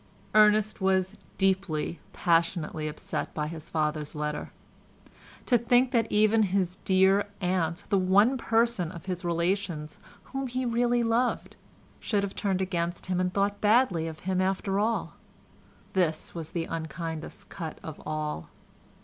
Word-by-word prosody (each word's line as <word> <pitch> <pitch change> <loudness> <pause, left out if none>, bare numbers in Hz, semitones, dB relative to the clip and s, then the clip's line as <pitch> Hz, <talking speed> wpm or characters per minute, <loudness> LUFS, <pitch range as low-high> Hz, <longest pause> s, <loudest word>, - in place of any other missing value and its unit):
Ernest 215 0 +4
was 190 +1 +1 0.2
deeply, 190 -5 0
passionately 165 -2 +1
upset 150 - -4
by 150 - -1
his 160 +1 -7
father's 150 -1 -1
letter; 150 0 -3 0.9
to 245 -2 +4
think 245 +2 +3
that 230 -3 +1
even 215 +1 +4
his 190 -2 0
dear 190 +2 +3
aunt, 180 -1 0
the 200 - +3
one 200 +7 +4
person 225 -7 +1
of 170 -1 -10
his 180 -1 -4
relations 170 -2 -1 0.3
whom 270 0 -2
he 255 +1 -2
really 240 0 +2
loved, 235 +2 0 0.4
should 205 -3 0
have 200 - -3
turned 190 -2 0
against 175 -2 -2
him 180 -1 -1
and 180 0 +1
thought 200 +1 0
badly 210 -7 +3
of 160 -1 -8
him 185 0 0
after 195 +1 0
all. 225 +2 0 0.8
This 170 -5 0
was 165 -2 -6
the 165 -1 -1
unkindest 160 0 -6
cut 165 -5 -6
of 160 -2 -8
all. 155 - -4
185 Hz, 140 wpm, -28 LUFS, 165-210 Hz, 0.9 s, Ernest